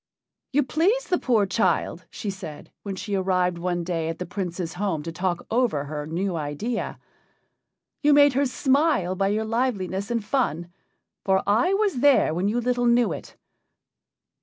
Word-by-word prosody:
"You 290 +2 +3
pleased 380 - +1
the 360 - +3
poor 225 -5 +2
child," 185 -3 0
she 205 - -4
said, 170 -6 -9
when 200 -2 -5
she 205 +2 -5
arrived 185 -2 +1
one 175 0 -1
day 165 -2 -2
at 165 - -4
the 180 - -4
Prince's 175 -4 -4
home 180 -5 -2
to 165 - -5
talk 175 +1 -2
over 225 - +1
her 150 0 -5
new 180 +3 -2
idea. 165 +10 -3 1.0
"You 295 - +4
made 285 -1 +6
her 275 +2 +2
smile 275 - +2
by 195 +1 0
your 215 +2 0
liveliness 205 -5 -1
and 230 -3 -1
fun. 175 - -1 0.5
For 190 -1 +2
I 235 - +3
was 400 - +1
there 275 - +4
when 180 +4 0
you 225 +4 +1
little 245 0 +1
knew 240 0 +3
it. - - -9
200 Hz, 165 wpm, -25 LUFS, 175-250 Hz, 1.0 s, made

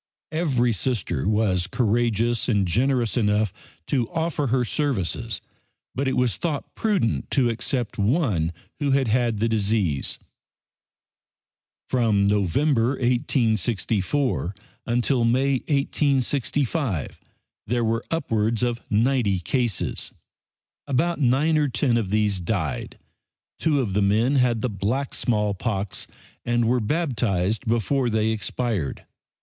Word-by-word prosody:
Every 135 -8 +1
Sister 100 - -1
was 100 -5 +1
courageous 115 +1 +1
and 100 -5 +2
generous 120 +4 +1
enough 105 -3 +1 0.3
to 120 -1 0
offer 160 -3 -1
her 125 0 +1
services, 115 - -1 0.5
but 135 +1 -1
it 130 - 0
was 125 -2 +1
thought 155 -5 -3
prudent 195 - 0
to 125 -4 +2
accept 120 0 -2
one 105 - +1 0.3
who 145 -2 0
had 135 -3 +2
had 120 -1 +1
the 110 +3 +1
disease. 105 -9 0 1.7
From 110 -5 +2
November, 115 - +2
1864, 115 - 0 0.3
until 120 +1 +1
May, 130 +3 +2
1865, 140 - 0 0.5
there 120 +1 +1
were 115 +1 0
upwards 115 -8 0
of 120 -1 -1
ninety 110 -2 +2
cases. 120 +2 -1 0.8
About 150 +5 0
nine 145 +5 +3
or 150 - +2
ten 120 0 +1
of 110 -5 0
these 105 -2 +1
died. 85 - -3 0.6
Two 155 -3 +2
of 110 -7 -1
the 105 - +2
men 110 +8 +2
had 120 -3 +2
the - - +2
black 110 +8 -2
smallpox, 105 -2 -1 0.4
and 120 -1 +1
were 125 +2 +3
baptized 110 - 0
before 120 +3 +1
they 110 0 +1
expired. 110 - -2
120 Hz, 115 wpm, -24 LUFS, 105-135 Hz, 1.7 s, nine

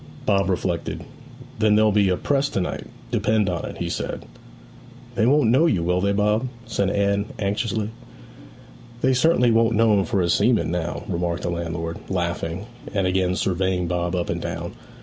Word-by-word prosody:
Bob 100 -2 +2
reflected. 90 -2 -2 0.6
'Then 110 -1 +4
there'll 110 0 +4
be 100 -2 +3
a 90 - +1
press 140 -1 +1
to - - -1
night; 90 - -3 0.2
depend 110 -2 +2
upon 85 -2 -2
it,' - - -9
he - - -3
said. - - -4 0.9
'They 115 -1 +2
won't 140 -4 +4
know 140 +7 +5
you, 90 - +1
will 90 +1 +1
they, 100 +1 +2
Bob?' 105 +4 +1 0.2
said 100 -1 0
Anne 100 0 +1
anxiously. 105 +1 -1 1.1
'They 130 - +3
certainly 125 -3 +4
won't 115 0 +3
know 115 0 +4
him 100 -1 +3
for 115 -5 0
a 85 - +1
seaman 110 -4 +2
now,' 85 -1 -3
remarked 85 -1 -2
the 85 - -1
landlord, 85 -1 -4
laughing, 85 0 -2 0.3
and 100 -2 +2
again 90 0 +1
surveying 95 -1 0
Bob 85 +1 -1
up 90 -1 -1
and - - -3
down. - - -4
100 Hz, 175 wpm, -23 LUFS, 90-110 Hz, 1.1 s, know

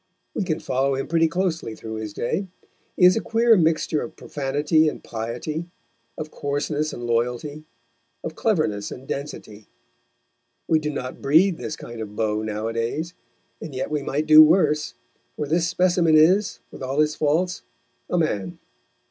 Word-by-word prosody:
We - - -1
can 165 -4 -1
follow 135 +1 0
him 135 - -2
pretty 165 0 +2
closely 165 -8 -2
through 110 0 -7
his 110 -1 -5
day. 160 - -2 0.5
He 180 - +6
is 180 - +7
a 225 - 0
queer 230 0 +4
mixture 160 -3 +1
of 155 - -7
profanity 145 +3 +1
and - - -9
piety, 120 +9 -4 0.5
of 155 0 -6
coarseness 145 +2 -2
and 120 - -7
loyalty, 125 +6 -1 0.6
of 160 - -4
cleverness 155 - 0
and 130 +2 -10
density; 110 -7 -6 1.0
we 160 - +3
do 150 -1 -3
not 130 -3 -5
breed 165 +5 +4
this 150 - -4
kind 120 -5 -9
of 105 -1 -7
beau 110 -1 0
nowadays, 115 +9 -3 0.5
and 145 - -7
yet 130 - -3
we 150 -1 0
might 145 +2 -2
do 155 0 +9
worse, 155 -2 +3 0.4
for 150 - -3
this 165 +3 +1
specimen 175 -2 +3
is, 185 +6 +3
with - - -11
all 135 +2 -2
his 150 0 +3
faults, 160 +5 0 0.5
a 180 - 0
man. 100 - -1
150 Hz, 160 wpm, -23 LUFS, 125-165 Hz, 1.0 s, do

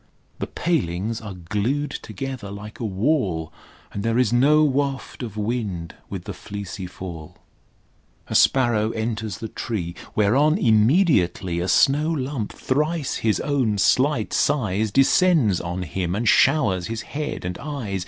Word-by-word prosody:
The - - -3
palings 115 - -1
are 105 -4 -7
glued 105 - -2
together 125 -2 -6
like 105 +2 -9
a 115 - -3
wall, 95 - 0 0.4
And 100 - -3
there 115 +2 0
is 125 -3 +2
no 145 +5 +5
waft 140 -2 -1
of 110 -4 -6
wind 105 -6 -3 0.2
with - - -5
the - - -6
fleecy 100 -2 -7
fall. 85 -4 -9 0.9
A - - -5
sparrow 120 -5 +3
enters 110 -3 -3
the 110 - -5
tree, 95 -6 -4 0.2
Whereon 135 - +3
immediately 110 - +3
A 90 - -1
snow 145 - +3
lump 135 -7 -2
thrice 150 +2 -1
his 110 -2 +1
own 130 -8 0
slight 130 +3 +2
size 110 -6 +1
Descends 135 - +3
on 90 +1 -4
him 90 +2 -2
and 115 +3 -1
showers 105 - +3
his 115 0 -4
head 145 -9 -4
and 90 0 -4
eyes. 130 -10 -4
110 Hz, 145 wpm, -23 LUFS, 95-135 Hz, 0.9 s, no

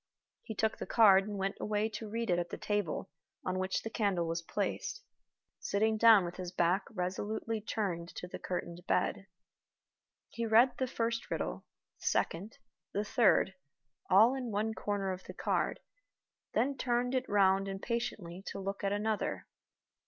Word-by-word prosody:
He 220 - -7
took 220 +1 0
the - - -5
card 195 -3 +6
and 205 -1 -4
went 195 0 -2
away 210 0 0
to 215 0 -6
read 230 -1 -1
it 175 - +3
at 175 0 -3
the - - -5
table 205 -8 -2 0.3
on 185 0 -1
which 185 0 -1
the 225 - -3
candle 200 -7 +1
was 165 +1 -2
placed, 470 - -3 0.6
sitting 220 +2 +1
down 220 -4 +7
with 175 - -6
his 180 -1 -5
back 180 +2 +2
resolutely 210 +3 -3
turned 190 -6 -2
to 180 - -6
the - - -7
curtained 175 -1 -4
bed. 195 - 0 1.0
He 230 -1 -3
read 235 +3 +5
the 260 - +1
first 230 -1 -2
riddle, - - -3 0.3
the - - -12
second, 195 +7 0 0.4
the 205 +1 0
third, 210 -3 +4 0.6
all 215 +6 +7
in 260 -3 -3
one 215 +1 -1
corner 200 -3 -2
of 185 0 -6
the - - -9
card, - - 0 0.8
then 265 +5 +2
turned 245 0 0
it 260 -1 -1
round 195 -1 +4
impatiently 195 -3 -3
to - - -5
look 195 +1 -4
at 195 - +1
another. 210 +1 -1
205 Hz, 165 wpm, -32 LUFS, 185-225 Hz, 1.0 s, down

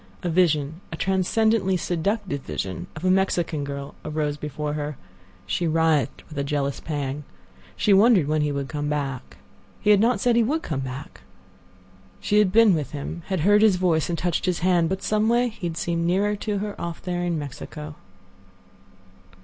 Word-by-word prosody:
A 175 - 0
vision—a 160 -1 0
transcendently 190 +1 +2
seductive 180 -2 -2
vision 95 -7 -5
of 155 +3 -6
a 185 - +4
Mexican 175 -5 +1
girl 140 0 -6
arose 150 -1 -2
before 150 0 -4
her. 150 -2 -4 0.5
She 175 - -1
writhed 160 -3 +1
with 150 -3 -6
a - - 0
jealous 140 -1 -1
pang. 145 -2 -4 0.5
She 205 - +3
wondered 195 - +5
when 155 0 +1
he 150 0 +1
would 140 -1 -3
come 145 0 -3
back. 140 -4 -3 0.4
He 210 - +3
had 205 - +6
not 230 0 +3
said 240 +2 +2
he 235 - +5
would 295 +8 0
come 150 -4 -3
back. 130 0 -7 1.0
She 210 - +2
had 205 -3 +3
been 225 -1 +6
with 150 -4 -2
him, 150 +4 -5
had 190 -4 -1
heard 205 +5 +5
his 215 -3 +5
voice 175 -4 +1
and 170 - -1
touched 175 +2 -1
his 180 -2 0
hand. 175 -2 +3
But 190 +1 -3
some 215 +1 +1
way 240 +1 +3
he 210 -5 -5
had 165 -1 -5
seemed 170 -1 -1
nearer 200 +4 +2
to 205 0 -3
her 205 +1 -4
off 170 -1 -5
there 175 -1 -2
in 175 -2 0
Mexico. 150 +1 -7
170 Hz, 180 wpm, -24 LUFS, 150-195 Hz, 1.0 s, had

